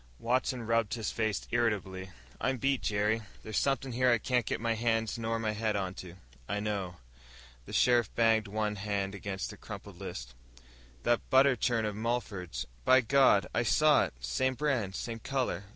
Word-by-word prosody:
Watson 125 0 0
rubbed 115 -1 +1
his 110 -2 -3
face 110 -2 -1
irritably. 100 -5 -1 0.3
"I'm 130 0 0
beat, 135 +1 +1
Jerry. 105 +2 +1 0.2
There's 110 - -1
somethin' 135 -1 0
here 125 +1 +2
I 120 - +5
can't 125 +1 0
get - - -1
my 115 0 0
hands 115 0 0
nor 115 0 -1
my 110 -1 -1
head 105 0 -1
onto." 95 -2 -4 0.3
"I 105 +1 -1
know." 100 -4 -3 0.7
The - - -9
sheriff 120 -3 +4
banged 115 -2 +3
one 105 +1 -1
big 100 - -8
hand 100 -1 -2
against 95 -1 -4
the - - -11
crumpled - - -9
list. - - -7 0.7
"That 120 -1 +1
butter 135 0 +5
churn 115 -2 +1
of 105 -1 -2
Mulford's. 110 - -3 0.2
By 130 - +6
God, 130 -5 +4
I - - +2
saw 150 +5 +4
it! - - -9
Same 130 - 0
brand, 125 -10 -1
same 115 -1 -4
color. 125 -7 -2
115 Hz, 175 wpm, -31 LUFS, 100-120 Hz, 0.7 s, By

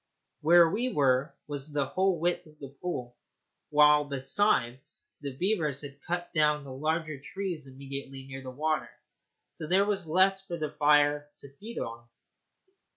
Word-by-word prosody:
Where 170 +2 +7
we 235 +9 -1
were 135 - +2
was 145 0 -6
the 145 -1 0
whole 185 +6 +1
width 175 +1 -1
of 155 0 -19
the 140 -2 -9
pool, 125 -9 -4 0.5
while, 150 0 +6
besides, 135 - 0 0.2
the 140 -2 -6
beavers 165 -8 0
had 140 -1 -10
cut 175 0 -3
down 150 -2 +3
the 135 -2 -8
larger 155 +1 -2
trees 175 -1 -5
immediately 135 0 -8
near 135 0 -8
the 130 - -7
water, 155 +4 -1 0.6
so 155 - -7
there 190 +4 +4
was 195 -4 -1
less 190 +4 +3
for 175 -3 -5
the 155 -2 -3
fire 145 0 +3
to 140 -1 -13
feed 230 +3 -9
upon. 115 +1 -5
150 Hz, 155 wpm, -29 LUFS, 140-175 Hz, 0.6 s, Where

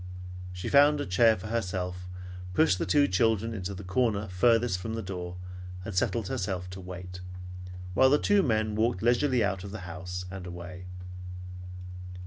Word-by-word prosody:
She 90 0 -5
found 145 +1 +6
a 145 - -1
chair 110 +5 +5
for 90 - -9
herself, 90 -5 -2 0.5
pushed 95 - +4
the - - -1
two 145 -1 +5
children 115 +3 +2
in 105 - -4
the 100 +1 -4
corner 105 +2 +1
farthest 115 +1 +3
from 110 +4 -3
the 115 - -3
door, 90 -2 -5 0.5
and 110 - -4
settled 100 +3 +1
herself 95 -2 -2
to 95 +1 -7
wait, 90 0 -7 0.7
while 130 +8 +6
the 145 - +6
two 205 +5 +4
men 110 - +1
walked 110 -1 +1
leisurely 120 +1 +4
out 95 -2 0
of 100 - -6
the 105 +1 -6
house 90 +1 -5
and 95 -1 -6
away. 90 +1 -7
100 Hz, 165 wpm, -29 LUFS, 90-115 Hz, 0.7 s, found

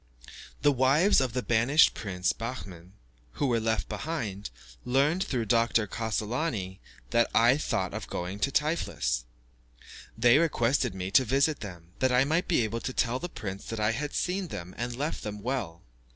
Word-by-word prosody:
The 145 - +6
wives 135 +8 +4
of 130 -3 -1
the 125 0 -1
banished 120 +7 +4
prince, 90 -3 -1
Behmen, 95 -7 -7 0.4
who - - -1
were 120 -3 +2
left 110 0 -1
behind, 115 -11 -4 0.3
learnt, 145 +8 +2
through 120 -4 -2
Dr. 115 0 +2
Cassolani, 110 - -3 0.3
that 120 0 +3
I 120 +3 +6
thought 150 - -2
of - - -5
going 90 +3 -4
to 140 - +1
Tiflis. 150 - 0 0.9
They 120 +4 +5
requested 125 - +1
me 95 0 -4
to 125 +5 +6
visit 135 +5 +1
them, 90 -4 -9
that 130 -1 +2
I 125 +1 +4
might 160 +5 0
be 160 -9 +2
able 110 +1 -2
to 130 - -4
tell 125 +1 0
the 175 - -5
prince 100 - -6
that 115 - -5
I 105 +1 +2
had 145 +6 -4
seen 185 +1 -1
them 90 - -7
and 120 0 -4
left 145 +5 -3
them 105 0 -5
well. 105 -8 -4
120 Hz, 170 wpm, -28 LUFS, 105-140 Hz, 0.9 s, The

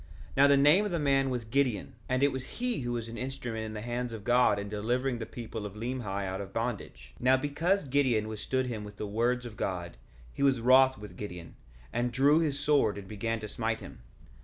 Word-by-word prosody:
1:8 - - -12
Now 140 +1 +7
the 140 0 +5
name 150 +8 +6
of 210 - -1
the 175 - -1
man 135 -3 +2
was 125 -3 -3
Gideon; 125 -4 0 0.2
and 130 +1 +1
it 140 - +4
was 130 0 -6
he 245 -1 0
who 120 -2 -2
was 115 -1 -3
an 115 -1 -7
instrument 125 -4 -4
in 110 - -6
the 105 - -4
hands 120 +1 -3
of 110 -2 -7
God 120 -2 +4
in 100 0 -4
delivering 120 +5 -1
the 115 - -5
people 115 -2 -6
of 105 -1 -7
Limhi 105 -4 -3
out 95 +1 -3
of 100 -1 -8
bondage. 100 - -4
1:9 - - -15
Now, 130 +1 +5
because 150 +6 0
Gideon 130 -6 +2
withstood 130 +4 -1
him 115 -4 -4
with 105 0 -9
the 105 - -3
words 120 +4 0
of 115 -3 -8
God 85 -8 -3 0.4
he - - -6
was 135 -3 +4
wroth 130 +2 +5
with 105 -1 -10
Gideon, 90 -5 -7 0.4
and 120 +1 0
drew 140 +5 +4
his 145 -4 0
sword 145 -8 +2
and 100 -2 -8
began 115 +2 -2
to 105 - -5
smite 110 +1 -2
him. - - -11
120 Hz, 235 wpm, -30 LUFS, 105-135 Hz, 0.4 s, Now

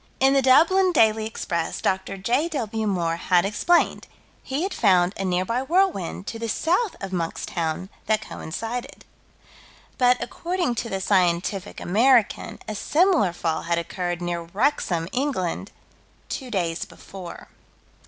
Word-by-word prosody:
In 270 +1 +5
the 275 - +4
Dublin 335 +9 +5
Daily 220 -7 +3
Express, 170 -6 -3
Dr. 190 +1 -1
J.W. 235 - -1
Moore 170 -4 0
had 180 +1 +2
explained: 335 - +1 0.3
he 275 +5 -3
had 385 0 -2
found 185 -3 +3
a 195 - -4
nearby 185 +6 0
whirlwind, 320 - 0
to 225 - -5
the 230 0 -3
south 360 - +1
of 195 -1 -6
Monkstown, 165 0 -2 0.2
that 215 0 +1
coincided. 225 +9 -6 0.9
But, 250 0 +5
according 350 -6 -2
to 230 0 -3
the 195 -2 -3
Scientific 185 0 +1
American, 230 +4 +2
a 215 - -3
similar 315 - +2
fall 165 -2 -2
had 170 0 -1
occurred 175 +1 -3
near 175 -1 -2
Wrexham, 175 - 0
England, 225 - -2 0.6
two 260 -3 -5
days 175 -6 -1
before. 185 -3 -10
210 Hz, 135 wpm, -24 LUFS, 175-265 Hz, 0.9 s, In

